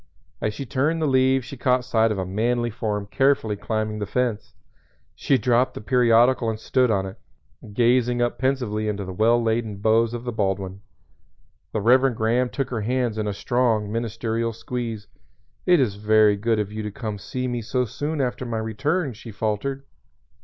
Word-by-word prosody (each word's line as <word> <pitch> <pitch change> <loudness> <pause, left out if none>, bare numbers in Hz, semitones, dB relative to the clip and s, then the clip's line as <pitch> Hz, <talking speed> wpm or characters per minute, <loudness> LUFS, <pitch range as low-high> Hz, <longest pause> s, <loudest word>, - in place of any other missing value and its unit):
As 105 -1 -1
she 140 - -5
turned 145 +6 0
the 160 - 0
leaves 130 -2 +3
she 135 - -8
caught 125 -1 +1
sight 115 -3 +2
of 105 - -2
a 95 - -2
manly 120 +5 0
form 105 -2 -3
carefully 130 -1 +1
climbing 110 +1 -3
the 105 - -3
fence. 120 -1 -2 0.6
She 135 - +1
dropped 125 0 +2
the - - -5
periodical 120 0 +3
and 110 -1 -3
stood 125 +2 +2
on 100 -3 +1
it, 95 - -9 0.5
gazing 120 +2 +2
up 120 0 0
pensively 125 -5 0
into 100 -2 -2
the 95 - -6
well 115 +5 +3
laden 115 -2 -1
boughs 115 +3 +2
of 120 - -6
the 125 - -3
Baldwin. 95 -3 -2 0.9
The 110 - -2
Reverend 125 +3 +4
Graham 120 +3 +1
took 135 -1 -3
her 115 -3 -2
hands 120 -1 -1
in 105 - -1
a - - 0
strong 115 -3 0
ministerial 115 0 -2
squeeze. 115 -2 -5 0.6
"It 180 -2 +6
is 125 -7 +2
very 105 0 +4
good 110 +2 0
of 105 -1 -2
you 110 +1 -4
to 105 - -4
come 110 -1 -5
to 100 - -13
see 130 0 -3
me 120 -1 -2
so 125 +3 -1
soon 145 +6 -3
after 125 0 -2
my 120 -2 -3
return," 135 - -1
she 115 +2 -11
faltered. 110 +7 -2
115 Hz, 190 wpm, -23 LUFS, 105-125 Hz, 0.9 s, It